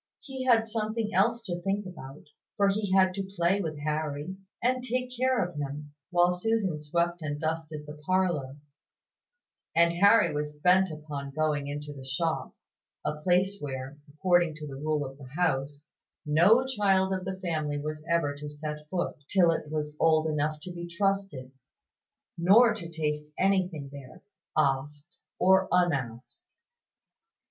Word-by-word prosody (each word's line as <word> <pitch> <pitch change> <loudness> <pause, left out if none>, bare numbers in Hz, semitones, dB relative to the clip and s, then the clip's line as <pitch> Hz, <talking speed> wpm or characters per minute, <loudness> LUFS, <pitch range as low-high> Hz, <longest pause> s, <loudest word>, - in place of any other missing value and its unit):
He 265 -2 -6
had 230 -3 +4
something 220 0 -2
else 235 0 +2
to 175 -5 -4
think 195 +3 -1
about; 145 -7 -10 0.3
for 200 -1 +4
he 200 -1 -1
had 190 -1 +4
to 195 0 -5
play 175 +4 +2
with 155 -4 -4
Harry, 150 +3 -3 0.2
and 250 +1 +1
take 250 +1 -2
care 255 0 +2
of 180 - -12
him, 145 +1 -5 0.2
while 175 0 +4
Susan 190 -3 0
swept 170 +3 -1
and 145 -1 -3
dusted 160 -1 -3
the 150 - -8
parlour: 175 -8 0 1.2
and 170 0 +5
Harry 200 +1 +5
was 150 0 -3
bent 185 +4 +4
upon 150 -3 -6
going 150 -1 -1
into 145 +1 -5
the 135 -2 -10
shop 160 +5 -2 0.5
a 150 0 -2
place 185 +4 +2
where, 135 0 -6
according 175 +1 +2
to 155 -1 -7
the 140 - -7
rule 150 +1 -1
of 135 +1 -9
the 130 -2 -11
house, 145 -3 0 0.4
no 180 +12 +5
child 195 -6 +2
of 185 -1 -2
the 190 0 -4
family 155 -5 -2
was 150 +1 -5
ever 170 -4 +2
to 150 +1 -7
set 150 0 -7
foot 180 -2 -2
till 180 -4 +5
it 155 -2 -3
was 150 -1 -3
old 160 -1 +4
enough 150 0 -1
to 180 - -7
be 170 0 -6
trusted; 195 -7 -1 0.9
nor 220 +7 +6
to 175 -7 -7
taste 150 -2 -3
anything 185 -6 +1
there, 135 -3 -11 0.3
asked 145 +4 -1 0.2
or 190 0 +4
unasked. 140 - 0
165 Hz, 155 wpm, -28 LUFS, 150-190 Hz, 1.2 s, nor